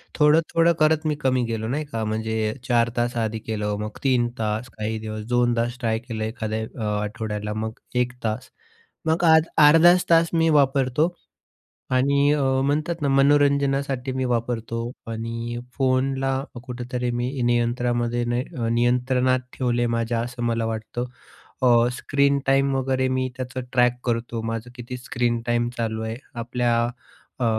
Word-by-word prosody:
थोडं-थोडं 165 +2 +4
करत 155 0 +3
मी 150 - +1
कमी 130 -2 +2
गेलो, 110 -1 -3
नाही 145 +6 -2
का. 115 -1 -2
म्हणजे 110 0 -1
4 120 -2 +3
तास 120 0 0
आधी 110 -1 -1
केलं, 105 -1 -3
मग 105 0 -5
3 125 -3 +3
तास 110 +2 -2
काही 110 +1 -2
दिवस 110 0 -5
2 120 -1 +2
तास 120 +1 -1
ट्राय 110 -2 0
केलं, 115 -2 -5
एखाद्या 110 0 -3 0.2
अ, 105 -1 0
आठवड्याला 105 0 -4
मग 110 +1 -3 0.3
1 125 - -7
तास 110 +2 -3 0.6
मग 160 +2 +1
आज 160 -1 +6
अर्धाच 165 +4 +7
तास 165 0 +5
मी 165 -1 +3
वापरतो 140 +2 +2 0.8
आणि 140 +2 +3
अ, 150 -1 +1 0.2
म्हणतात 155 +4 -1
ना, 145 - +1
मनोरंजनासाठी 140 -1 +2
मी 130 0 -1
वापरतो 115 -1 -2 0.3
आणि 115 +1 -4 0.2
फोनला 135 0 +1 0.2
कुठेतरी 125 -1 -4
मी 120 +1 -1
नियंत्रणामध्ये 120 0 +1
नाही 120 +1 -1
अ, 115 -1 -1
नियंत्रणात 125 +2 +2
ठेवले 120 -2 0
माझ्या 115 0 -1
असं 120 +1 -5
मला 115 -1 0
वाटतं. 115 +2 -3 0.6
अ, - - +4 0.3
स्क्रीन 140 +2 +1
टाईम 135 0 +3
वगैरे 130 0 0
मी 130 0 0
त्याचं 130 -1 -4
ट्रॅक 125 -1 +4
करतो. 115 -1 -2
माझं 115 +1 -4
किती 125 +1 -7
स्क्रीन 120 -2 -1
टाईम 120 0 +1
चालू 110 -1 -2
आहे. 110 +1 -4 0.2
आपल्या 120 0 0 0.6
अ, - - +1
120 Hz, 150 wpm, -24 LUFS, 115-135 Hz, 0.8 s, अर्धाच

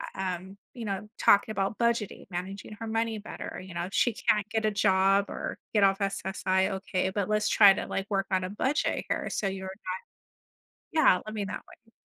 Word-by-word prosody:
U - - -4
um, 190 +1 -4 0.2
you 235 -3 -6
know, 200 +1 -4
talking 205 +2 +5
about 195 0 -1
budgeting, 235 -3 0
managing 190 +3 -6
her 225 - -5
money 225 0 -1
better, 205 - -7
uh, - - -6
you 185 -1 -10
know, 170 0 -2
if 190 - -9
she 240 - +3
can't 210 -1 +1
get 220 +1 0
a 215 - +2
job 195 0 +3
or - - -4 0.2
get 210 -2 +4
off 195 0 +4
SSI. 190 -1 0
Okay. 190 -1 -1
But 195 0 -2
let's 210 0 +2
try 200 -2 +8
to, - - -4
like, 195 +1 -3
work 195 -1 0
on 185 -1 +2
a 185 - -3
budget 265 - 0
here. - - -1
So 200 - -1
you're 190 0 -4
not 190 -1 -6 1.0
yeah, 280 - +5
I - - -4
mean 210 -2 -3
that - - -5
way. 225 - -19
195 Hz, 215 wpm, -28 LUFS, 190-215 Hz, 1.0 s, try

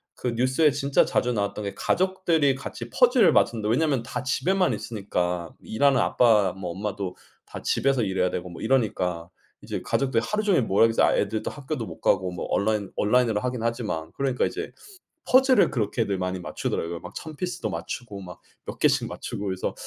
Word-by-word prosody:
그 125 - -3
뉴스에 130 +6 +2
진짜 140 0 +2
자주 125 0 0
나왔던 105 -1 -2
게 100 - -4
'가족들이 175 -7 +1
같이 120 -3 -7
퍼즐을 245 - +4
맞춘다.' 110 -2 +2
왜냐하면 135 +1 +2
다 115 +3 -5
집에만 180 +8 +1
있으니까. 90 -6 -3
일하는 135 +3 +2
아빠 105 -6 +3
뭐 90 -2 -5
엄마도 100 0 -4 0.3
다 - - -9
집에서 135 -2 +1
일해야 95 -3 +1
되고 90 +1 -4
뭐 85 - -10
이러니까 100 -9 0 0.3
이제 - - -5
가족들이 130 -4 0
하루 210 0 -1
종일 195 - +3
뭐하겠어요. 115 +2 +3
애들도 105 +1 -2
학교도 140 -4 -5
못 - - -10
가고 95 -1 +2
뭐 90 - -5
온라인 105 -1 0
온라인으로 110 -1 +2
하긴 125 -2 -2
하지만. 115 -9 -2
그러니까 135 -2 0
이제 415 +3 -5 0.5
퍼즐을 260 -3 +5
그렇게들 105 -3 -1
많이 90 0 -2
맞추더라고요. 85 -1 -3
막 - - -10
1000 155 -1 -7
피스도 175 -8 -3
맞추고 100 +5 -6
막 90 -1 -10 0.3
몇 - - -7
개 - - +5
씩 - - +1
맞추고 105 - -6
그래서 95 -1 -2
115 Hz, 410 characters per minute, -25 LUFS, 95-135 Hz, 0.5 s, 퍼즐을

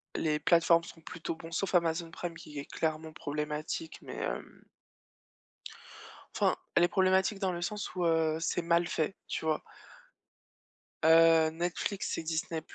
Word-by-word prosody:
les 150 -1 +1
plateformes 170 -1 +4
sont 165 - -12
plutôt 165 0 -5
bon 165 +1 -10
sauf 190 +2 -1
Amazon 165 -1 +2
Prime 170 0 -6
qui 150 -2 -10
est 140 - -4
clairement 160 0 -3
problématique 150 +2 -4
mais, - - -8
hem - - -5 1.7
enfin, - - +3 0.2
elle 175 - +5
est - - +6
problématique 190 +2 +2
dans 190 -2 0
le 175 0 -4
sens 205 +2 -3
où, 175 -1 0
heu, 160 -1 +2
c'est 170 +1 0
mal 170 0 +3
fait, 160 +5 -1
tu - - -3
vois? 155 -1 +1 1.4
Heu, 165 0 +7
Netflix 175 +4 -2
et - - -3
Disney 160 0 -2
165 Hz, 150 wpm, -31 LUFS, 160-175 Hz, 1.7 s, Heu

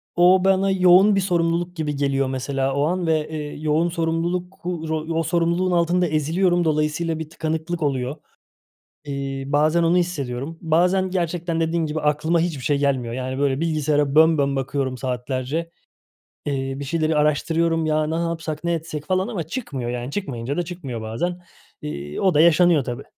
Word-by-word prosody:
o 180 +1 +5
bana 195 0 +3
yoğun 190 +2 +6
bir 195 - +2
sorumluluk 175 -1 0
gibi 150 -3 -2
geliyor 140 -1 0
mesela 135 +1 -1
o 140 - +1
an 175 +2 -1
ve, 155 -1 +1
eee, 150 -2 -5
yoğun 155 +3 +1
sorumluluk 170 +2 -2
u 170 -3 -3
ro 160 -1 -2
o - - +1
sorumluluğun 170 +3 +1
altında 175 +1 +2
eziliyorum 170 +4 +1
dolayısıyla 155 +1 0
bir 160 -1 -6
tıkanıklık 160 +1 -3
oluyor. 135 -1 -1 0.9
İii, 140 -1 -4
bazen 155 +3 +3
onu 165 +2 +3
hissediyorum. 150 -4 -2
Bazen 180 +3 +2
gerçekten 170 -2 -1
dediğin 165 0 0
gibi, 155 0 -3
aklıma 150 +3 +1
hiçbir 160 -6 -2
şey 145 0 +1
gelmiyor. 135 -4 0
Yani 130 +1 -4
böyle 140 -1 +1
bilgisayara 150 -3 +1
bön 160 +1 +6
bön 140 -1 +1
bakıyorum 135 -1 -2
saatlerce. 130 +6 -3 0.8
Eee, 135 -1 -2
bir - - -4
şeyleri 155 +2 0
araştırıyorum. 160 +2 +1
Ya 155 0 +1
ne 160 - -2
yapsak, 165 -2 -3
ne 170 0 0
etsek 155 -2 -4
falan 185 +3 0
ama 205 -8 -3
çıkmıyor 145 - -5
yani 125 +2 -4
çıkmayınca 140 -7 -4
da 175 - +1
çıkmıyor 160 -10 -6
bazen. 120 +12 -3 0.4
İii, 75 0 -5
o 190 -2 +3
da 150 - +5
yaşanıyor 170 -2 +5
tabii. 120 -1 -5
160 Hz, 170 wpm, -22 LUFS, 140-170 Hz, 0.9 s, yoğun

